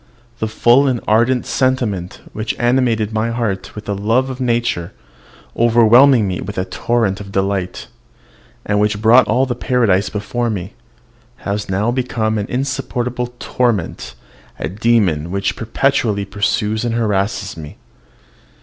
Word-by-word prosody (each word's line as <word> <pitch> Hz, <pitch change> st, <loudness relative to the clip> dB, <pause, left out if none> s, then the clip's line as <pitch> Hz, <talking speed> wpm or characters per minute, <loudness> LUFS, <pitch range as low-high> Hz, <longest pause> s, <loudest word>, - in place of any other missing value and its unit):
The 110 Hz, -, -1 dB
full 120 Hz, +5 st, +4 dB
and 125 Hz, -3 st, 0 dB
ardent 120 Hz, +4 st, +2 dB
sentiment 120 Hz, -9 st, -1 dB
which 110 Hz, +1 st, -3 dB
animated 120 Hz, -3 st, +1 dB
my 110 Hz, +1 st, 0 dB
heart 115 Hz, -5 st, -3 dB
with 105 Hz, -, -8 dB
the 100 Hz, -, -2 dB
love 115 Hz, +7 st, 0 dB
of 130 Hz, 0 st, -7 dB
nature, 120 Hz, -8 st, -1 dB, 0.6 s
overwhelming 120 Hz, +1 st, +5 dB
me 90 Hz, -1 st, -3 dB
with 105 Hz, -, -7 dB
a 95 Hz, -, -1 dB
torrent 105 Hz, +1 st, -1 dB
of 100 Hz, -1 st, -9 dB
delight, 95 Hz, -2 st, -2 dB, 0.8 s
and 105 Hz, 0 st, +1 dB
which 105 Hz, 0 st, +1 dB
brought 115 Hz, +2 st, +5 dB
all 125 Hz, +5 st, +2 dB
paradise 120 Hz, -5 st, +1 dB
before 115 Hz, +3 st, -2 dB
me, 95 Hz, -4 st, -4 dB, 0.7 s
has 105 Hz, 0 st, -3 dB
now 100 Hz, +5 st, 0 dB
become 115 Hz, -4 st, -1 dB
an 100 Hz, -, -3 dB
insupportable 125 Hz, -2 st, -3 dB
torment, 120 Hz, -10 st, -2 dB, 0.4 s
a -, -, -3 dB
demon 100 Hz, -6 st, +1 dB
which 100 Hz, +1 st, -1 dB
perpetually 110 Hz, -3 st, 0 dB
pursues 105 Hz, +2 st, -1 dB
and 120 Hz, -1 st, -1 dB
harasses 105 Hz, -2 st, -1 dB
me. 75 Hz, -3 st, -10 dB
110 Hz, 135 wpm, -18 LUFS, 100-120 Hz, 0.8 s, overwhelming